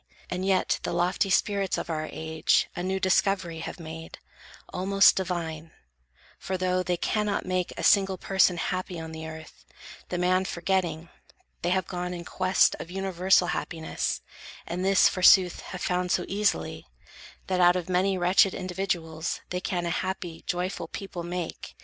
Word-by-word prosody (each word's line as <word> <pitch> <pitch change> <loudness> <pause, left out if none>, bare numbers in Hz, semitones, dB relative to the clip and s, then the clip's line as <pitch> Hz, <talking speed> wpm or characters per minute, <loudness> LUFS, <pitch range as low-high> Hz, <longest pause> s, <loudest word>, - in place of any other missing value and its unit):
And 180 +1 -2
yet 190 -1 +1
the - - -3
lofty 180 +3 +1
spirits 195 0 +1
of - - -4
our 155 -2 -3
age 160 0 +1
A - - -3
new 190 +1 -1
discovery 185 -3 +1
have 165 - -6
made, 160 0 -8 0.6
almost 195 +2 +5
Divine; 165 -4 -3 0.7
for, 190 - -3
though 185 0 +1
they 180 -1 -1
cannot 210 +3 -1
make 185 -1 -1
A - - -4
single 195 -2 +4
person 190 -1 +2
happy 185 0 -3
on 160 0 -7
the 160 0 -7
earth, 160 - -11 0.5
The 180 - -2
man 185 +1 +2
forgetting, 170 -3 -1 0.5
they 175 - 0
have 185 -1 +1
gone 180 0 -4
in 170 -1 -7
quest 185 0 +3
Of 165 - -7
universal 185 -1 +2
happiness, 160 - -3 0.4
and 180 +2 -3
this, 195 0 +5
Forsooth, 185 -1 +5
have 180 - -6
found 180 0 0
so 175 - +1
easily, 195 - -1 0.6
that 185 -1 0
out 175 0 +6
Of 180 -1 -2
many 185 +1 +1
wretched 180 +2 +4
individuals, 175 -4 -3
They 180 0 -2
can 175 -1 -2
a 170 - -1
happy, 180 -2 -4
joyful 180 -1 -2
people 195 0 -6
make. 175 0 -5
180 Hz, 160 wpm, -27 LUFS, 170-190 Hz, 0.7 s, out